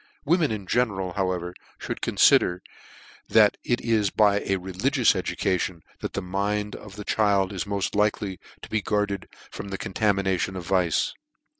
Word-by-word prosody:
Women 165 0 +3
in 105 -3 -4
general, 95 -5 0
however, 90 -2 -2 0.3
mould - - -4
confider 90 0 +4 0.7
that 110 -2 +5
it 120 - 0
is 110 -4 +2
by 105 -1 +3
a 100 - -1
religious 105 +8 +1
education 90 -2 -1 0.2
that - - -5
the 100 - -3
mind 100 +3 -2
of 100 -2 -11
the 105 -1 -8
child 100 -2 +2
is 95 - -3
moft 100 -1 -2
like 105 0 +2
ly 95 -4 -5 0.2
to - - -9
be 110 - 0
guarded 105 -1 -1 0.2
from - - -7
the 100 0 -4
contaminations 95 -2 0
of 90 - -6
vice. 90 -3 +1
100 Hz, 160 wpm, -25 LUFS, 95-105 Hz, 0.7 s, that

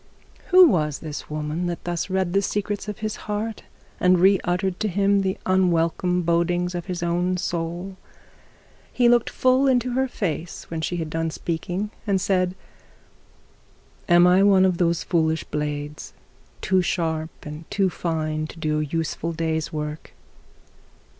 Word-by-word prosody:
Who 365 -1 +8
was 150 - +1
this 155 -2 -7
woman 155 +3 -3
that 175 -1 -4
thus 175 +1 -3
read 190 -2 0
the 200 - +3
secrets 205 +1 -2
of 210 - -5
his 215 - -2
heart, 210 +1 -3 0.4
and 180 0 +4
re 190 +2 +5
uttered 180 +1 -1
to 215 - 0
him 200 +1 +2
the 190 -1 -1
unwelcome 180 -1 +2
bodings 175 +1 +1
of 175 +1 -5
his 180 -2 -3
own 175 +2 0
soul? 175 +2 -4 0.9
He 245 - +3
looked 240 -1 +4
full 255 +2 +3
into 250 -1 +2
her 265 +2 +1
face 175 - -4
when 165 -1 -3
she 175 - -2
had 160 -2 -4
done 165 0 -1
speaking, 175 +6 -3 0.2
and 195 -2 +2
said, 185 -1 +1 1.5
'Am 175 0 +7
I 180 +2 +5
one 195 -2 +5
of 185 -2 +1
those 170 -1 +1
foolish 160 -2 +1
blades, 150 0 -4 0.5
too 190 -1 +2
sharp 160 -3 -1 0.2
and 150 +2 -8
too 195 -2 +1
fine 155 -2 -2
to 155 - -12
do 155 -1 -1
a - - 0
useful 165 +2 -3
day's 160 -1 -2
work?' 150 0 -5
175 Hz, 155 wpm, -23 LUFS, 160-195 Hz, 1.5 s, Who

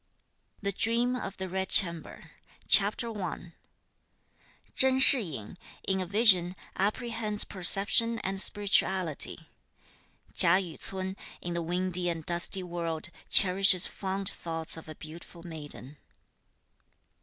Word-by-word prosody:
THE 200 - 0
DREAM 235 +5 0
OF 195 -6 -7
THE 190 - -6
RED 190 +1 -4
CHAMBER. 170 -4 -2 0.4
CHAPTER 215 +3 +4
I. 170 -1 -7 1.2
Chen 265 -1 +3
Shih 265 -1 +6
yin, 155 - -8 0.3
in 190 -1 0
a 185 - -5
vision, 190 -3 +4 0.2
apprehends 215 +1 -3
perception 200 +5 +1
and 190 0 -2
spirituality. 190 -6 0 0.8
Chia 170 +10 +5
Yü 180 -5 -6
ts'un, 190 0 -6 0.2
in 175 - -6
the 170 - -3
(windy 180 +1 -1
and 165 -2 -6
dusty) 175 +2 +1
world, 170 -2 -5 0.2
cherishes 190 -1 +5
fond 195 0 -5
thoughts 165 -2 -1
of 160 -1 -11
a 155 - -9
beautiful 165 +2 -13
maiden. 150 -4 -6
185 Hz, 120 wpm, -27 LUFS, 170-200 Hz, 1.2 s, Shih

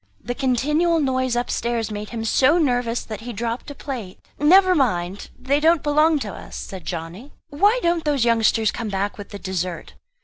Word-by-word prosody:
The 245 - -4
continual 300 +7 +1
noise 260 -3 0
upstairs 235 -2 -1
made 210 0 -5
him 225 -1 -5
so 265 +8 +4
nervous, 245 -6 0
that 215 -1 -7
he 240 +2 -6
dropped 235 +4 -4
a 285 - -8
plate. 240 -10 -6 0.2
"Never 370 +5 +6
mind, 195 - -1
they 265 +3 0
don't 325 0 +3
belong 305 +2 +3
to 205 -4 -4
us," - - -10
said 190 -2 -7
Johnny. 175 - -6 0.2
"Why 405 +11 +3
don't 340 -1 +1
those 285 -5 +1
youngsters 225 -1 +3
come 225 -2 -5
back 200 +1 -2
with 200 - -8
the 200 - -7
dessert?" 185 -3 -4
245 Hz, 180 wpm, -22 LUFS, 210-295 Hz, 0.2 s, Never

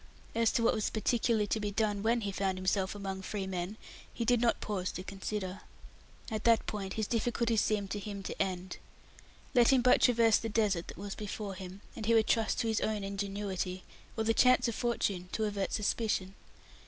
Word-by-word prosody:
As 230 0 +3
to 230 - +2
what 230 - +4
was 215 - 0
particularly 225 -1 +1
to 220 - -1
be 210 -1 -1
done 205 -1 0
when 230 +2 +2
he 200 -2 -2
found 190 -1 -1
himself 190 +1 0
among 195 -1 -4
free 195 0 -3
men, 185 +2 -4 0.3
he 235 - -3
did 245 0 +3
not 235 -1 +2
pause 190 -4 -2
to 185 - -5
consider. 195 0 -4 0.7
At 215 -1 -2
that 230 -1 +5
point 195 -2 -4
his 220 - -1
difficulties 230 0 +1
seemed 205 -2 0
to 205 - -2
him 200 -1 -6
to - - -4
end. 185 -1 -2 0.8
Let 240 -3 +6
him 260 -2 +4
but 250 - +5
traverse 230 -3 +5
the 225 - -4
desert 205 -6 +1
that - - -9
was 200 +1 -5
before 210 -1 -5
him, 190 +1 -9
and 220 -2 -5
he 230 - +5
would 220 -1 +5
trust 225 -1 +1
to 230 - -1
his 220 -1 +1
own 215 -2 -1
ingenuity, 195 -2 -3 0.3
or 220 - +1
the 225 +1 +2
chance 250 +1 +5
of 235 - -1
fortune, 200 -6 -1
to 220 - 0
avert 200 -2 -2
suspicion. 210 -3 0
210 Hz, 205 wpm, -32 LUFS, 195-225 Hz, 0.8 s, Let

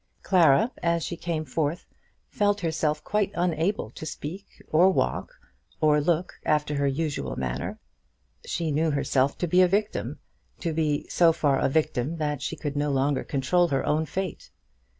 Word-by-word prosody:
Clara, 185 - +4
as 170 -1 +1
she 170 - -3
came 165 -2 -3
forth, 155 +4 -2 0.4
felt 205 -1 +1
herself 155 -2 -1
quite 210 -1 0
unable 175 - 0
to - - -10
speak, 160 +4 -7
or 175 +4 +6
walk, - - -1 0.4
or 150 -1 +4
look 170 +3 -1
after 150 -1 +1
her 140 0 +1
usual 145 +2 -2
manner. 65 -1 -3 0.7
She 165 -2 -2
knew 160 +3 +1
herself 140 -1 +1
to 175 - -1
be 180 +3 +4
a 185 - +6
victim, 205 +3 -1 0.4
to 165 -2 -1
be 150 -1 0
so 170 -2 +4
far 145 -4 +1
a - - +2
victim 150 0 0
that 150 -3 -2
she - - -3
could 145 -2 -4
no 145 +1 0
longer 140 0 +1
control 175 +6 +1
her 135 -4 -1
own 155 +1 +1
fate. 190 +5 -4
160 Hz, 165 wpm, -26 LUFS, 145-175 Hz, 0.7 s, or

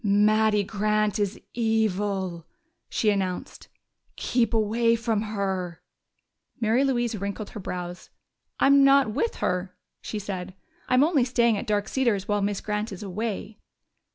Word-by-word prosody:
"Mattie 210 +1 +3
Grant 215 0 0
is 205 -1 -1
evil," 205 -6 0 0.4
she 215 - +2
announced. 190 -3 -3 0.5
"Keep 235 -3 +1
away 230 +1 +2
from 225 -2 0
her!" 190 -5 -3 0.8
Mary 230 +4 +2
Louise 240 -4 0
wrinkled 200 +1 -5
her - - -7
brows. 180 -2 -6 0.5
"I'm 280 0 +6
not 275 -4 +5
with 460 - -1
her," 180 0 -2 0.3
she 215 - -5
said. 190 -2 -5 0.3
"I'm 255 +2 +5
only 300 -4 +3
staying 235 -2 +2
at 210 - -4
Dark 210 0 0
Cedars 225 -8 0
while 205 -1 +1
Miss 200 0 -1
Grant 210 +1 -2
is 195 +1 -7
away." 210 +2 -4
210 Hz, 135 wpm, -26 LUFS, 195-230 Hz, 0.8 s, I'm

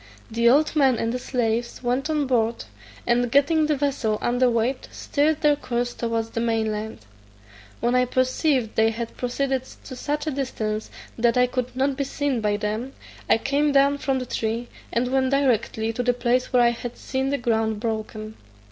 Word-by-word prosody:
The 235 +1 +3
old 300 +5 +3
man 270 -5 +4
and 230 +1 -1
the 250 - -2
slaves 235 -1 -2
went 250 +5 0
on 300 -2 +1
board, 235 - 0 0.4
and 240 0 +2
getting 300 +3 +3
the 305 - +2
vessel 270 -6 0
under 245 +1 +2
weigh, 235 +3 +1
steered 305 +2 0
their 295 -1 +4
course 245 -3 -2
towards 230 -1 -2
the - - -3
main 225 -2 0
land. 210 - -6 0.8
When 240 +1 +1
I 250 0 +4
perceived 255 -1 +1
they 220 0 +4
had 230 +1 -5
proceeded 260 +1 -1 0.2
to 260 - -8
such 295 +4 -3
a 310 - -1
distance 220 -6 -3 0.3
that 235 +1 +3
I 250 - +5
could 250 0 -3
not 270 +1 0
be 280 - 0
seen 275 -3 -1
by 210 -1 +1
them, 215 +5 -3 0.4
I - - +6
came 285 +5 +1
down 280 +1 +4
from 270 -1 0
the 255 - -3
tree, 230 +1 -2 0.2
and 245 +1 0
went 265 -1 +2
directly 230 -5 +1
to 245 - -2
the 245 0 +2
place 245 +1 0
where 250 -2 +5
I 235 - +5
had 235 0 -6
seen 265 0 -2
the 280 - 0
ground 225 -3 0
broken. 215 -1 -4
245 Hz, 190 wpm, -24 LUFS, 230-275 Hz, 0.8 s, I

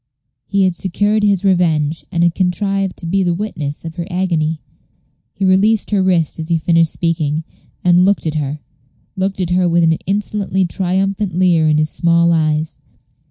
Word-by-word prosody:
He 200 0 +1
had 185 -1 +2
secured 205 +4 0
his 200 -2 +1
revenge, 165 -5 +1
and 170 0 +1
had 170 -1 +3
contrived 195 +1 -1
to - - -9
be 195 +4 0
the 175 -2 0
witness 160 -7 -5
of 165 +1 -7
her 170 0 -4
agony. 165 -4 -1 0.8
He 195 - -1
released 200 +4 +2
her 200 -2 +2
wrist 175 -4 +1
as 160 - -4
he 170 - +2
finished 165 0 +2
speaking, 160 -2 -1 0.4
and 175 0 +4
looked 200 -1 +1
at 155 - -1
her 150 -1 -3 0.5
looked 190 +1 -2
at 180 -2 -2
her 180 0 +2
with 170 0 +2
an 165 0 +4
insolently 200 -1 -1
triumphant 190 +1 -1
leer 175 -3 +3
in 155 -1 +3
his 155 0 0
small 170 0 +2
eyes. 155 -2 -1
175 Hz, 175 wpm, -17 LUFS, 160-190 Hz, 0.8 s, and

